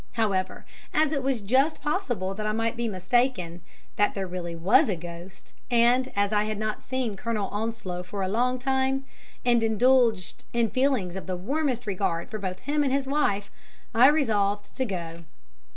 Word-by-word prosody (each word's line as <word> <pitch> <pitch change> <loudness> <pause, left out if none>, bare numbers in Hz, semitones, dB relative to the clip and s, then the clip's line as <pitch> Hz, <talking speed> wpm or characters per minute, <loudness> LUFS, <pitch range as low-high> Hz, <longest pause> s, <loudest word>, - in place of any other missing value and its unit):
However, 200 -5 -1 0.3
as 310 -1 +3
it 280 -3 0
was 260 -5 -1
just 265 +9 +2
possible 245 - -1
that 215 +2 -4
I 215 - 0
might 225 +1 -1
be 235 0 -1
mistaken 185 -3 0 0.4
that 205 - +2
there 195 -1 -2
really 175 -2 -5
was 200 - +4
a 195 - +1
ghost, 175 +2 -10 0.2
and 245 +2 +3
as 200 +1 +1
I 210 0 +2
had 215 -1 -3
not 215 0 -3
seen 255 -5 -2
Colonel 210 -1 -2
Onslow 210 -4 -3
for 190 +2 -5
a - - 0
long 245 +6 +1
time, 265 +1 0 0.4
and 240 -1 +4
indulged 225 -3 +2
in 235 -2 +1
feelings 255 -9 +1
of 190 - -6
the 185 -1 -2
warmest 255 - -1
regard 180 0 -2
both 215 -2 -4 0.2
for - - -25
him 290 +2 +1
and 270 - 0
his 275 0 +1
wife, 205 -8 0 0.4
I 240 +4 +7
resolved 205 -9 +1
to 260 - 0
go. 170 -5 -5
220 Hz, 180 wpm, -26 LUFS, 195-260 Hz, 0.4 s, I